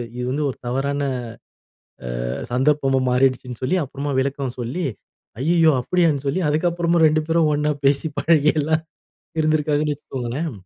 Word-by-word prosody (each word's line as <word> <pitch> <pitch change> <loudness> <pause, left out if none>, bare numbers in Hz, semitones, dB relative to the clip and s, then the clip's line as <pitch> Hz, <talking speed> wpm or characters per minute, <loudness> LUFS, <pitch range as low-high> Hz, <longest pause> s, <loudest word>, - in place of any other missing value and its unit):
இது 125 - -4
வந்து 150 +2 -1
ஒரு - - -6
தவறான 140 +3 -1 1.2
அ - - -3 0.2
சந்தர்ப்பமும் 135 0 +2
மாறிடுச்சுன்னு 125 -1 +1
சொல்லி, 165 +9 +1
அப்புறமா 140 +1 -4
விளக்கம் 135 -1 -2
சொல்லி 125 +10 -3 0.6
"ஐய்யய்யோ!" 165 +3 +4
அப்படியான்னு 150 -1 +1
சொல்லி, 165 +7 0
அதுக்கப்புறமா 170 +2 +1
2 155 0 +2
பேரும் 165 -1 +3
ஒண்ணா 150 +1 +1
பேசி, 140 +3 +2
பழகி 155 -2 +4
எல்லாம் 155 +2 0 0.6
இருந்திருக்காங்கன்னு 150 -1 +1
வச்சுக்கோங்களேன். 135 +2 -4
145 Hz, 130 wpm, -21 LUFS, 135-160 Hz, 1.2 s, ஐய்யய்யோ